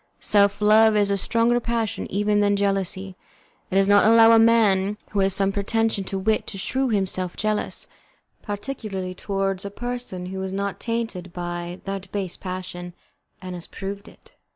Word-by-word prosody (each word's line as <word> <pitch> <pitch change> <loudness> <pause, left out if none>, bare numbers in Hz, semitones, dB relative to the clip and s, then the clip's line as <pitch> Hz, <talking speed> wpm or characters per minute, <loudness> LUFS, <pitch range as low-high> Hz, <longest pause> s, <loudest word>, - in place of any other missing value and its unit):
Self 200 0 +2
love 215 +1 +6
is 205 -1 +2
a - - +3
stronger 230 +4 +2
passion 230 -2 -2
even 205 +1 +1
than 205 0 +3
jealousy; 195 -1 -1 0.5
it - - -3
does 195 0 +4
not 205 0 +6
allow 225 +1 +7
a 225 - +7
man 210 -3 +4
who 205 - -1
has 195 0 +3
some 195 0 +2
pretension 215 +1 0
to 195 - -3
wit 215 +3 0
to 195 - -6
shew 260 +7 -1
himself 190 -4 -1
jealous, 215 -1 -1 0.6
particularly 205 -4 -5
towards 195 0 -2
a 200 - -4
person 240 -4 -5
who 190 +1 -5
is 190 0 -4
not 200 0 -3
tainted 225 -6 -3
by 175 0 -5
that 195 -1 -5
base 190 -4 -3
passion, 180 -1 -6 0.5
and 185 0 -6
has 175 -2 -7
proved 200 +1 -7
it. - - -18
200 Hz, 170 wpm, -23 LUFS, 190-220 Hz, 0.6 s, allow